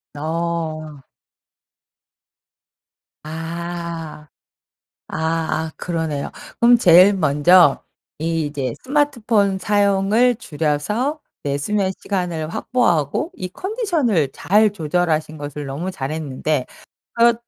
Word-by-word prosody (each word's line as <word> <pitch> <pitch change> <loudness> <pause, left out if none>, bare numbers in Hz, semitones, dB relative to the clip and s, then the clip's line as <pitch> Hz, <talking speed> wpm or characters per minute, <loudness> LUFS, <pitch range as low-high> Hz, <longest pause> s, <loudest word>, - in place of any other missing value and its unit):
어. 155 -1 -3 2.2
아. 165 -1 -6 0.8
아아 160 0 -2
그러네요. 160 -5 -3 0.3
그럼 240 +1 +6
제일 185 -1 +7
먼저 160 -1 +4 0.3
이제 150 -4 -2
스마트폰 235 -9 +1
사용을 205 +4 +3
줄여서 210 - -1 0.2
내 140 -1 -1
수면 195 +6 0
시간을 175 -5 -2
확보하고 180 - 0
이 185 - -5
컨디션을 325 - 0
잘 210 +2 +3
조절하신 160 -3 -1
것을 145 0 -6
너무 150 +8 -4
잘했는데 150 -2 -2 0.5
그렇 235 0 +5
170 Hz, 190 characters per minute, -20 LUFS, 155-205 Hz, 2.2 s, 제일